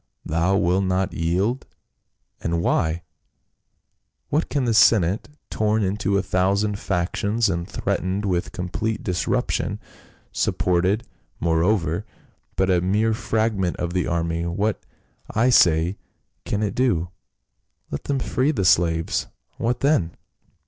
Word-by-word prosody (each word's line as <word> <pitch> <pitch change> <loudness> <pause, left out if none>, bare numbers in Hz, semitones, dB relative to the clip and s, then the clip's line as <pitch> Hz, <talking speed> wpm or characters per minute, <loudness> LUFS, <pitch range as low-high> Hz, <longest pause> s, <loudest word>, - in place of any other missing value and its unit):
Thou 85 +5 +1
wilt 95 +1 +2
not 95 0 0
yield, 95 +10 -1 0.7
and 85 0 -1
why? 85 0 +1 1.3
What 155 +3 0
can 140 -3 0
the 115 - +1
senate, 105 -3 +4 0.2
torn 110 0 +1
into 100 +1 0
a 100 - 0
thousand 100 +3 +1
factions 100 +4 0
and 85 -1 -2
threat - - -1
ened 95 +3 -2
with 90 -1 -1
complete 105 +5 -3
disruption, 90 -3 -1 0.5
supported, 90 +5 +1 0.4
moreover, 85 +2 +1 0.5
by - - +2
a 95 -2 +2
mere 105 +5 +2
fragment 110 -5 0
of 85 0 -3
the 90 -1 0
army, 85 0 -1
what, 100 +4 -1 0.5
I 120 +4 +2
say, 85 -2 +4 0.5
can 105 +1 -1
it 100 -2 -1
do? 100 -10 +1 0.8
Let 70 - -5
them 140 - 0
free 130 +1 0
the 105 -11 0
slaves, 80 -2 +2 0.3
what 120 +2 -1
then 135 - +1
95 Hz, 125 wpm, -23 LUFS, 85-110 Hz, 1.3 s, senate